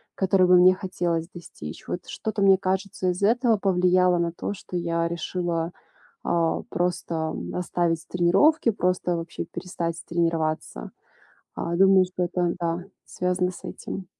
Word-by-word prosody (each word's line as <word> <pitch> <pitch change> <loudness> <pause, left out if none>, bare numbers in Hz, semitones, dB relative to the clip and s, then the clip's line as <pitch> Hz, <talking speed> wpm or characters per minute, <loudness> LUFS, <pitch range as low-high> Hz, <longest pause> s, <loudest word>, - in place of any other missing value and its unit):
которого 185 -1 +3
мне 180 +1 +7
хотелось 175 -3 -2
достичь. 80 - -9
Вот 175 - -4
что-то, 220 -1 -4
мне 195 -1 +6
кажется, 190 -1 -1
из 180 +2 -2
этого 230 +1 +3
повлияло 180 -2 +3
на 170 -1 0
то, 190 - -4
что 180 -2 -6
я 170 -1 0
решила, 170 0 -2 0.5
а, 165 -1 +1
просто, 175 -1 -1
м, 160 -1 -3
оставить 170 -2 -1
тренировки, 195 - +3
просто 180 -3 0
вообще 165 0 -5
перестать 170 -2 -5
тренироваться. 165 -2 -1 0.7
А, 170 0 -2
думаю, 190 0 +6
что 180 0 -3
это, 175 -1 0
да, 170 +1 -2 0.2
связано 180 0 -1
с - - -13
этим. 190 - -6
180 Hz, 140 wpm, -25 LUFS, 170-185 Hz, 0.7 s, мне